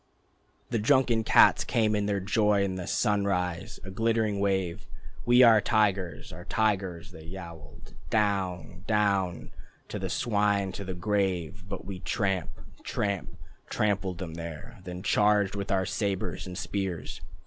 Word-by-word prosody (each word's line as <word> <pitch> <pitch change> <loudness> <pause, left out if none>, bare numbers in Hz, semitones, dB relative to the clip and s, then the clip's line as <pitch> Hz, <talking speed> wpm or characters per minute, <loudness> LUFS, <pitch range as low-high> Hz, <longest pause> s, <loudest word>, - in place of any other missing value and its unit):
The 115 - +1
drunken 115 +1 +3
cats - - +6
came 110 -2 +1
in 105 -1 0
their 100 -1 0
joy 105 0 +2
In 95 -1 -1
the 90 -1 -5
sunrise, 100 -2 0
a 95 - -7
glittering 110 -1 +1
wave. 95 -1 -1 0.4
"We 120 +1 +7
are 115 -3 +7
tigers, 95 -8 0
are 90 +2 -9
tigers," 100 -3 -1
they 80 -3 -12
yowled. 85 -4 -10 0.2
"Down, 95 -5 -1
Down, 100 -5 0 0.4
Go - - -4
the - - -3
swine 100 -3 +1
to 100 - -6
the 95 -1 -5
grave." 95 0 -1
But 95 - -6
we 95 -1 -6
tramp 95 -3 -1 0.3
Tramp 100 -2 -3 0.3
Trampled 100 -4 0
them 85 -2 -6
there, 85 +7 -8
Then 90 0 -7
charged 105 -1 +3
with 100 -1 -4
our 95 -1 +2
sabres 95 -3 -2
and 90 -1 -7
spears. 95 -6 -4
100 Hz, 145 wpm, -28 LUFS, 90-105 Hz, 0.4 s, We